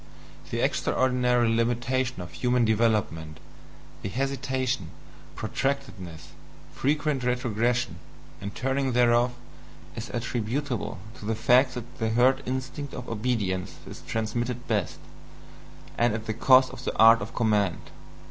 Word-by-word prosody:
The - - -2
extraordinary 125 -2 +2
limitation 120 +1 0
of 85 - -10
human 125 -1 +2
development, 105 -8 0 0.6
the 100 - -3
hesitation, 130 -4 -1 0.5
protractedness, 110 - -3 0.4
frequent 145 -1 0
retrogression, 120 -4 0 0.4
and 100 +1 -6
turning 135 0 0
thereof, 120 0 +3 0.6
is 115 +1 -6
attributable 120 +2 -2 0.2
to - - -9
the 110 +1 0
fact 125 +3 +4
that 125 +1 -8
the 110 -1 0
herd 125 +4 +4
instinct 130 +2 -4
of 125 - -7
obedience 105 -5 -1
is - - -9
transmitted 120 +3 -2
best, 105 -6 -1 1.0
and 120 -2 +3
at 110 0 -5
the 110 - -2
cost 130 +3 +5
of 130 0 -9
the - - -3
art 115 +1 +8
of 105 - -7
command. 105 -7 +1
120 Hz, 120 wpm, -27 LUFS, 110-130 Hz, 1.0 s, art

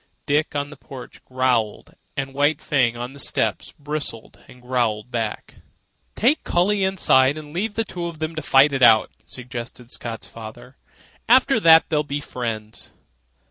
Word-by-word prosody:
Dick, 150 +1 0
on 145 0 -2
the - - -11
porch, 135 -4 -11
growled, 125 -4 -1 0.2
and 135 -1 -3
White 145 +2 +2
Fang, 125 -5 +1
on 120 +2 -6
the 140 - -11
steps, - - 0
bristled 145 -6 -5
and 125 - -15
growled 120 -3 -1
back. 115 -3 -4 0.6
"Take 275 +8 +2
Collie 195 +3 +1
inside 150 -7 +3
and 150 -1 -10
leave 205 +4 -2
the 225 - 0
two 175 -3 -5
of 170 -2 -7
them 155 +1 -3
to 155 - -4
fight 140 0 +5
it 135 - -1
out," 110 -3 +6 0.2
suggested 125 -1 -7
Scott's 115 -2 -6
father. 115 +3 -11 0.5
"After 260 0 +5
that 165 -4 +6
they'll 150 -1 +2
be 145 -1 -4
friends." 115 -6 -6
140 Hz, 160 wpm, -22 LUFS, 120-155 Hz, 0.6 s, out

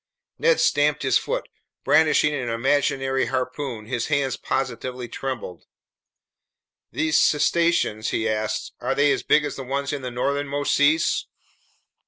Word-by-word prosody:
Ned 485 0 +3
stamped 150 0 +2
his 130 -2 +3
foot. - - -3 0.4
Brandishing 150 -1 +3
an 125 -5 -3
imaginary 135 +2 0
harpoon, 130 -3 -3
his 120 0 -2
hands 140 -3 0
positively 125 -1 -3
trembled. 120 -8 -6 1.2
"These 160 -1 +1
cetaceans," 150 -7 +2
he 115 - -1
asked, 110 0 -2
"are 135 - -1
they 145 0 +3
as - - 0
big 150 0 +3
as 145 - -5
the 135 - -5
ones 140 +2 -2
in 145 - -4
the 125 - -4
northernmost 140 +3 -1
seas?" 155 +3 +2
135 Hz, 135 wpm, -23 LUFS, 125-145 Hz, 1.2 s, Ned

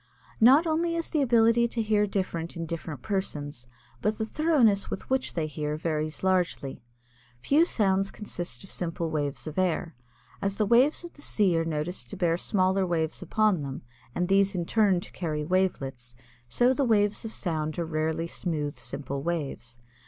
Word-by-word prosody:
Not 270 +8 +7
only 335 +1 0
is 335 -1 -3
the 310 - +2
ability 235 -2 +4
to 230 0 -2
hear 210 -1 +2
different 175 -4 -3
in 165 - -3
different 160 -5 -6
persons, 145 -10 -3 0.3
but 210 +1 0
the 220 - -1
thoroughness 240 -8 +2
with - - -5
which 265 0 0
they 165 -3 0
hear 150 0 -3
varies 155 0 -2
largely. 180 -9 0 0.6
Few 290 - +3
sounds 195 - +1
consist 180 -4 -5
of 195 - -8
simple 165 -2 -2
waves 145 -3 -2
of 155 +3 -4
air. 175 -2 0 0.5
As 195 0 -1
the 215 - +2
waves 250 - +4
of 345 - -9
the 290 - -11
sea 200 -10 +2
are 165 0 +1
noticed 160 +3 -3
to 200 - -7
bear 170 -3 +2
smaller 190 +1 +2
waves 165 -3 -1
upon 215 -6 +2
them 135 -3 -6 0.3
and 180 - 0
these 195 +1 +3
in 175 -2 -1
turn 200 -3 +3
to - - -10
carry 155 -4 -3
wavelets, 135 -9 -1 0.3
so 245 - +3
the 280 - +1
waves 210 -4 +2
of 225 - -5
sound 155 -7 -2
are 170 - -1
rarely 160 +1 -1
smooth, 155 -5 -3
simple 135 +3 -5
waves. 140 -8 -4
180 Hz, 175 wpm, -27 LUFS, 155-215 Hz, 0.6 s, Not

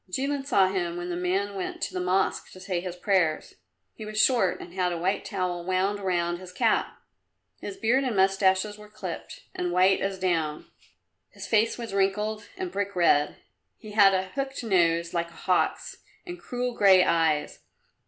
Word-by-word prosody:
Jilin 275 +7 -2
saw 195 -8 +4
him 175 -3 -2
when 175 0 -5
the - - -2
man 190 +3 -1
went 190 -2 -5
to - - -3
the 185 - -2
Mosque 185 +1 0
to 185 - -12
say 185 -2 -3
his 180 -1 -6
prayers. 180 -4 0 0.4
He - - -10
was 215 0 -4
short 215 -7 +3
and 175 - -10
had 180 -1 0
a 175 - -3
white 180 +4 -1
towel 180 -3 -3
wound 190 +3 0
round 175 -3 -1
his 185 -1 -10
cap. 180 - 0 0.6
His 195 - -7
beard 245 +4 +2
and 250 -5 -1
moustaches 195 +2 +2
were 210 0 -13
clipped 195 -5 -7
and 180 -1 -2
white 185 +2 +3
as 195 0 -2
down; 165 -5 -1 0.6
his - - -9
face 225 +1 +2
was 230 -4 -6
wrinkled 210 +2 -1
and 370 -1 -4
brick 200 -1 -3
red. 150 -4 +3 0.4
He 215 -3 -11
had 200 -2 +5
a 190 0 -2
hooked 270 +2 -4
nose 170 -5 +2
like 170 -1 -1
a - - -18
hawk's, 185 -1 0 0.3
and 355 -1 -7
cruel 245 0 -3
grey 195 -4 +6
eyes. 160 -4 +1
190 Hz, 185 wpm, -26 LUFS, 180-210 Hz, 0.6 s, grey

